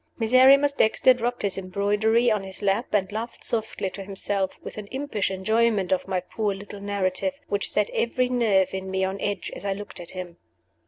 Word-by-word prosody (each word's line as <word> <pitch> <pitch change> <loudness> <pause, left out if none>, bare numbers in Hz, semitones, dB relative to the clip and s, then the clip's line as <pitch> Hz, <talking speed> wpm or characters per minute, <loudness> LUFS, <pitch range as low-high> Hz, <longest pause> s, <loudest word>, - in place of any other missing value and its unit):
Miserrimus 260 +5 +6
Dexter 255 -1 +4
dropped 245 -1 -3
his 195 -1 -1
embroidery 210 +5 +1
on 210 -2 +1
his 190 +1 -8
lap, 200 +5 0
and 195 -2 +1
laughed 225 +3 -6
softly 220 -4 -1
to 195 - -7
himself, 195 0 -2
with - - -8
an 205 - -8
impish 260 -4 -2
enjoyment 210 0 +1
of 185 - +1
my 190 -1 0
poor 205 +2 -2
little 205 +1 -10
narrative, 200 +8 -1
which 200 -1 0
set 210 - +1
every 250 +2 0
nerve 215 -7 +2
in 190 0 -4
me 190 0 -1
on 190 +1 -2
edge 205 -3 -2
as - - -9
I 200 -1 0
looked 205 -1 -8
at 175 -1 -1
him. 180 -2 -5
205 Hz, 195 wpm, -25 LUFS, 190-230 Hz, -, Miserrimus